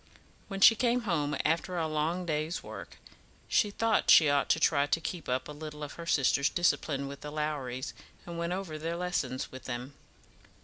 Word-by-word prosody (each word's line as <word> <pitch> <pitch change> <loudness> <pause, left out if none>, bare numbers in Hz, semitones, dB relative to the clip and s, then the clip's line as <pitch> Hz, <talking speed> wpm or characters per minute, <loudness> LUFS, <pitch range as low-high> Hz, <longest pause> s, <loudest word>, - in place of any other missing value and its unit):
When 195 -1 -5
she 225 - +10
came 240 +2 +1
home 150 -9 -1
after 170 +3 0
a 165 -2 0
long 160 +4 -1
day's 155 +1 -2
work, - - -9 0.5
she 210 - +3
thought 225 +1 +1
she 155 -3 +8
ought 140 -1 +1
to - - +3
try 145 -3 +3
to 165 - +1
keep 165 -2 -5
up 130 +1 -1
a - - -7
little 150 0 -8
of 145 - -6
her 170 0 -9
sister's 140 -2 +3
discipline 145 -5 0
with 140 0 -8
the 150 - -7
Lowries, 145 -4 -3 0.3
and 170 - -7
went 170 +1 -2
over 180 -5 -4
their 165 +2 -3
lessons 150 -8 -2
with 130 - -10
them. 125 +2 -5
155 Hz, 190 wpm, -30 LUFS, 145-175 Hz, 0.5 s, she